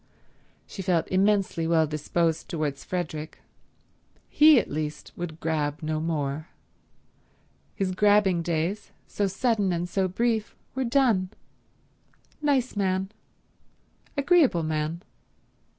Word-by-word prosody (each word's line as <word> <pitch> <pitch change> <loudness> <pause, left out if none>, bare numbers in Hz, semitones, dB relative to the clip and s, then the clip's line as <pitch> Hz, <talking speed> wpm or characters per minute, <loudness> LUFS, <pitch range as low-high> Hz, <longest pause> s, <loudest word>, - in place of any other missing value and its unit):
She 195 - -7
felt 180 -3 +1
immensely 190 -3 +1
well 165 -1 +3
disposed 155 +2 -1
towards 150 -4 -3
Frederick. 160 -4 -4 0.9
He, 300 -3 +7
at - - -3
least, 155 0 -5
would 165 -2 -6
grab 150 -2 -2
no 155 0 -1
more. 155 -1 -2 1.3
His 190 -1 -1
grabbing 205 -2 +3
days, 170 +5 -2 0.2
so 205 - -1
sudden 205 0 +1
and 175 0 -1
so 190 +1 0
brief, 220 +3 -1 0.2
were 265 0 -1
done. 235 -7 +2 1.1
Nice 275 -5 +1
man; 190 -1 0 1.1
agreeable 280 - +4
man. 155 +2 -2
180 Hz, 105 wpm, -26 LUFS, 160-210 Hz, 1.3 s, He